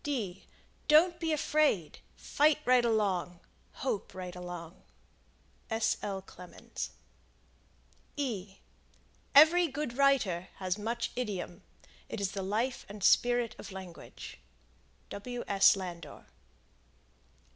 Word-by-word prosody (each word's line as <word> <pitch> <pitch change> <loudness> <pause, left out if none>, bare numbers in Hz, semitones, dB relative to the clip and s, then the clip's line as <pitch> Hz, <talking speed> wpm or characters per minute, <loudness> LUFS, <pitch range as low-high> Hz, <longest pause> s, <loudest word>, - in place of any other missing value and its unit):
Don't 335 +3 +5
be 325 -1 -1
afraid. 295 - +1 0.2
Fight 300 0 +2
right 250 -1 +5
along. 195 -6 0 0.5
Hope 210 -8 -2
right 180 -1 -6
along. 175 -1 -8 0.9
S.L. 205 -3 -1
Clemens. 180 -2 -8 2.5
Every 330 +4 +8
good 280 -3 -4
writer 215 -11 +3
has 185 -1 -2
much 235 +3 -2
idiom; 200 -7 -4 0.5
it 225 - -4
is 195 -1 -1
the 195 - -4
life 220 +7 -1
and 205 -1 -8
spirit 240 0 +3
of - - -8
Language. 185 -3 -10 0.7
W. 245 +4 -5
S. 195 0 +6
Landor. 180 -3 -7
210 Hz, 95 wpm, -31 LUFS, 185-255 Hz, 2.5 s, Every